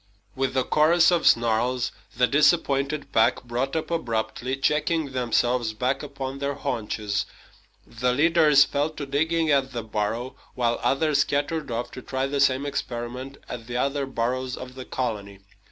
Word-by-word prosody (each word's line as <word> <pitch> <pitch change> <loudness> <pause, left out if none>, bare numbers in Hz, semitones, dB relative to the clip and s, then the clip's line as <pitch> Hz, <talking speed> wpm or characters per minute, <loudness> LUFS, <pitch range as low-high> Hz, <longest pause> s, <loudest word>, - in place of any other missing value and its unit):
With 135 0 -1
a 130 - +3
chorus 165 +6 +4
of 175 -2 +2
snarls, 120 +2 +2 0.3
the 125 - +5
disappointed 145 0 +2
pack 110 +2 +3
brought 125 +4 -2
up 160 +1 -2
abruptly, 120 -3 -2
checking 150 +1 0
themselves 120 -2 +1
back 130 +4 0
upon 140 -2 -6
their 140 0 -2
haunches. 105 -5 -2 0.6
The 125 +2 -1
leaders 150 0 +5
fell 145 +2 0
to 150 -2 -6
digging 160 +3 +1
at 135 -2 +2
the 120 -2 -3
burrow, 110 +4 -2 0.2
while 120 -2 0
others 145 +1 +2
scattered 145 +2 0
off 120 +1 -3
to 130 - -8
try 130 +1 -2
the 140 +1 -2
same 140 0 +3
experiment 130 -1 -5
at 120 -2 -7
the 120 0 -3
other 140 +1 0
burrows 130 +1 -2
of 130 0 -8
the 130 0 -8
colony. 100 -5 -4
130 Hz, 155 wpm, -25 LUFS, 120-145 Hz, 0.6 s, the